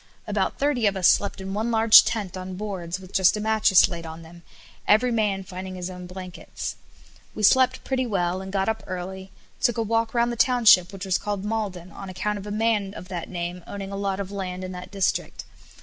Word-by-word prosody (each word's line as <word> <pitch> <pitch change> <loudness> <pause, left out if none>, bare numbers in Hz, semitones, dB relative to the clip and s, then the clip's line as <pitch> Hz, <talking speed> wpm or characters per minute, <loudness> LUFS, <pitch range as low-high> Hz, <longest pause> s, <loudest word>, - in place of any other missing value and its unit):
About - - -1
thirty 275 -6 +1
of 200 -1 0
us 185 - +4
slept 200 - +2
in 190 0 -5
one 220 +3 -1
large 225 -1 +8
tent 205 -6 -3
on 185 0 -6
boards, 185 -3 -5
with 185 0 -14
just 190 +2 +4
a - - -3
mattress 215 -3 +4
laid 170 -1 -6
on 160 0 -9
them, 170 +1 -14 0.5
every 235 +4 +4
man 210 -4 0
finding 185 0 -7
his 180 0 -5
own 180 -1 -9
blankets. 185 0 -7 0.6
We 215 - -4
slept 260 +4 +4
pretty 260 -1 -1
well, 185 -3 -1
and 190 0 -7
got 195 -1 0
up 220 0 -1
early, 190 +1 -6 0.3
took 240 -3 +2
a 230 - +1
walk 225 +1 0
round 235 0 +2
the - - -3
township, 230 -7 +5
which 195 -1 -7
was 190 -1 +1
called 205 -2 -3
Maulden, 200 -5 -3
on 195 +3 -9
account 205 +3 -2
of 200 - -9
a - - -5
man 210 -2 0
of 180 - -10
that 175 -3 -5
name 175 0 -5
owning 200 -1 -6
a - - -4
lot 195 -1 -2
of 200 -1 -5
land 185 -2 -5
in 185 - -5
that 180 0 -8
district. 195 -1 -1
195 Hz, 220 wpm, -24 LUFS, 185-215 Hz, 0.6 s, large